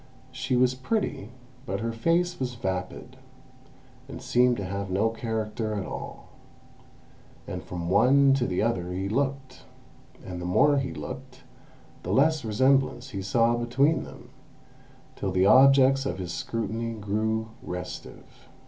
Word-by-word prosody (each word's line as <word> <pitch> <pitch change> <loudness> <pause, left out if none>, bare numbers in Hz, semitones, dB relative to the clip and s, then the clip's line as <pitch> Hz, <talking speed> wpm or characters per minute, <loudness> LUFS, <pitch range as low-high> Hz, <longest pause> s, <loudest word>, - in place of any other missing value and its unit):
She 125 - -2
was 125 0 +3
pretty, 130 - -2 0.4
but 95 -1 -2
her 115 0 -2
face 170 +10 0
was 125 -2 -3
vapid, 95 -5 -5 0.9
and - - -7
seemed 125 0 +2
to 100 - -4
have 100 +1 -4
no 100 +4 +1
character 110 -1 -3
at 100 - -3
all. - - -8 1.2
And - - -6
from 85 -1 -5
one 130 +8 +5
to 135 -2 +1
the 90 +2 -1
other 90 -6 -1
he 95 +2 -2
looked, 135 +3 -3 0.6
and 90 -1 -6
the - - -5
more 140 +11 +4
he 135 -1 -3
looked 130 0 -8 0.6
the 90 - -5
less 150 +5 +3
resemblance 130 +3 +1
he 100 - -4
saw 115 +5 +2
between 130 +6 +1
them, - - -13 0.8
till 95 - -3
the 95 +1 +2
objects 135 +3 +6
of 90 - -3
his 90 -2 -5
scrutiny 115 +1 -3
grew 110 +1 -2
restive.... 90 0 -8
115 Hz, 140 wpm, -26 LUFS, 100-130 Hz, 1.2 s, objects